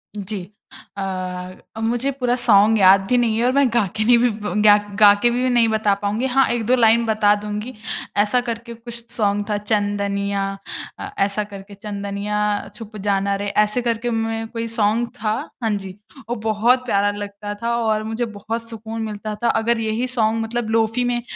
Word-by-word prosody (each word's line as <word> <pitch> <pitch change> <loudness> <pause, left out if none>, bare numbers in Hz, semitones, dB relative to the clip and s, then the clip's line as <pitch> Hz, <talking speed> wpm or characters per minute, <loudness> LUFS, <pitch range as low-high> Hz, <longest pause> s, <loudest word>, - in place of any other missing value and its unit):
जी। 200 -1 -6 0.5
अ, 185 -1 -4 0.3
मुझे 240 +4 0
पूरा 250 -2 0
सॉन्ग 220 -2 +4
याद 190 0 +7
भी 250 - +3
नहीं 225 -2 +2
है 235 - +1
और 250 - +3
मैं 280 -1 +4
गा 235 -3 +3
के 215 - +1
भी 245 +1 +3 0.3
गा 210 -1 +8 0.2
गा 205 -1 +9
के 240 - +5
भी 250 +1 +1
नहीं 240 -2 +4
बता 215 -2 +2
पाऊँगी। 210 +5 -1
हाँ 270 -1 +4
1-2 240 +1 +2
लाइन 230 -1 +4
बता 215 -2 +3
दूँगी। 210 +4 -5 0.4
ऐसा 215 +5 +3
करके 235 0 -4
कुछ 230 +1 -9 0.2
सॉन्ग 205 -2 0
था 205 - +1
चंदनिया 200 -1 -1 0.6
अ, - - -5 0.2
ऐसा 205 +1 -2
करके 200 0 -11
चंदनिया 200 0 -4 0.4
छुप 215 -2 -9
जाना 200 0 +1
रे। 200 +1 -3 0.2
ऐसे 210 +4 -1
करके 235 0 -1
मैं 225 0 -2
कोई 230 0 -4
सॉन्ग 225 +1 +1
था। 215 -1 +1 0.3
हाँ, 225 - +1
जी। 195 -2 -6 0.3
वो 240 - -1
बहुत 225 +3 +2
प्यारा 205 -3 +2
लगता 205 0 -6
था 235 0 +1
और 220 -2 0
मुझे 225 +2 -2
बहुत 225 +2 -5
सुकून 225 0 -6
मिलता 215 0 -4
था। 235 - +3
अगर 235 0 +1
यही 225 +3 -1
सॉन्ग 225 -2 +1
मतलब 230 0 -3
लोफी 225 +2 +1
में 245 0 0
220 Hz, 180 wpm, -21 LUFS, 205-235 Hz, 0.6 s, गा